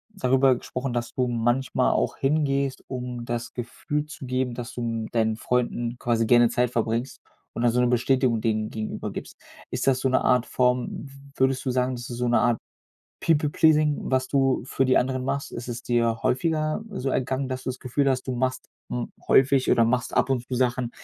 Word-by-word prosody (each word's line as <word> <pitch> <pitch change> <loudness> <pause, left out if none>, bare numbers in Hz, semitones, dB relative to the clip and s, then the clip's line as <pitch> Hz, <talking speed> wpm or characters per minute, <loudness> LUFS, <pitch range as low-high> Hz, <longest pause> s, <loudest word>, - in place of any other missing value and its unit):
darüber 135 -6 +3
gesprochen, 125 +1 -4
dass 120 0 -3
du 125 -1 0
manchmal 120 +2 +1
auch - - 0
hingehst, 140 -1 0
um 125 -2 -5
das 120 0 -4
Gefühl 150 +5 -3
zu 150 -3 -9
geben, 130 0 -1
dass 120 -1 -6
du 120 - -5
m 115 -1 -3
deinen 110 -1 +1
Freunden 120 0 -1
quasi 115 -1 +1
gerne 120 0 +5
Zeit 120 0 +1
verbringst 115 +2 -2 0.3
und 115 - -4
dann 120 - +4
so 125 - +1
'ne 125 - +3
Bestätigung 125 -1 +2
denen 110 -1 0
gegenüber 110 -1 -4
gibst. - - -8 0.3
Ist - - -2
das 130 -1 +4
so 130 - +1
'ne 130 - +2
Art 125 -1 +3
Form 125 -1 +1 0.2
w - - -15 0.2
würdest 130 0 +1
du 130 - +1
sagen, 125 0 0
das 120 +1 -7
ist 120 - -5
so 125 - 0
'ne 120 - +3
Art 120 -2 +2 0.6
People 150 -2 +2
Pleasing, 155 -1 +3
was 130 0 0
du 135 -3 +2
für 135 - 0
die 130 - +4
anderen 130 0 -1
machst? 140 +1 -2
Ist 120 +1 -6
es 120 0 -5
dir 115 -1 0
häufiger, 155 - 0
äh, - - -5
so 135 - -2
ergangen, 130 +1 -1
dass 130 0 -4
du 130 - -2
das 130 - -7
Gefühl 135 +2 0
hast, 130 -1 -1
du 130 - -2
machst 130 +1 -2 0.2
m - - -3 0.2
häufig 135 0 +4
oder 115 - +5
machst 125 +1 0
ab - - +3
und 125 -2 0
zu 130 - -4
Sachen, 125 -1 0
125 Hz, 210 wpm, -25 LUFS, 120-135 Hz, 0.6 s, gerne